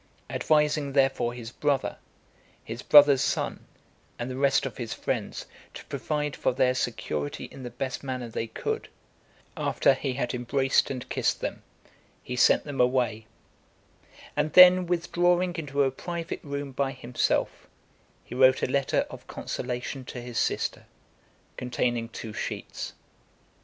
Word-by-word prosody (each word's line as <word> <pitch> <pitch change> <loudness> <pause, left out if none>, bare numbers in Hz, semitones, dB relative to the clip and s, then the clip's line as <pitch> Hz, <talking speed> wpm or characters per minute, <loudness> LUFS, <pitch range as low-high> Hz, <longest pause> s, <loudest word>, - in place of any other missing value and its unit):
Advising 150 -2 +2
therefore 135 -3 +2
his 120 -1 -8
brother, 140 0 0 0.7
his 115 +2 -6
brother's 145 -3 +7
son, - - -1 0.5
and 120 +2 -4
the - - -4
rest 135 0 +2
of - - -5
his 120 -3 -4
friends, - - -3 0.3
to - - -9
provide 150 -2 -2
for - - 0
their 125 0 +3
security 75 - -3
in 135 - -11
the 125 - -5
best 130 +2 -4
manner 130 -2 -4
they 115 0 -4
could, 110 - -3 0.7
after - - +3
he 135 0 -3
had 125 -1 -2
embraced 135 +2 +1
and 130 -2 -5
kissed - - 0
them, - - -4 0.6
he 125 - -5
sent 125 - +5
them 145 -3 -2
away; 120 -3 +1 1.1
and 150 +1 0
then 180 0 +9
withdrawing 175 +1 +1
into 145 -3 0
a 135 - +1
private 170 +4 -5
room 140 -1 -4
by 135 +1 -1
himself, 125 -1 -1 0.6
he - - -10
wrote 130 +1 +5
a - - 0
letter 140 -1 +1
of - - -11
consolation 125 +2 -4
to 125 - -7
his 120 -1 -4
sister, - - -1 0.7
containing 120 -2 -1
two 110 -1 -7
sheets. - - -5
135 Hz, 140 wpm, -27 LUFS, 125-145 Hz, 1.1 s, then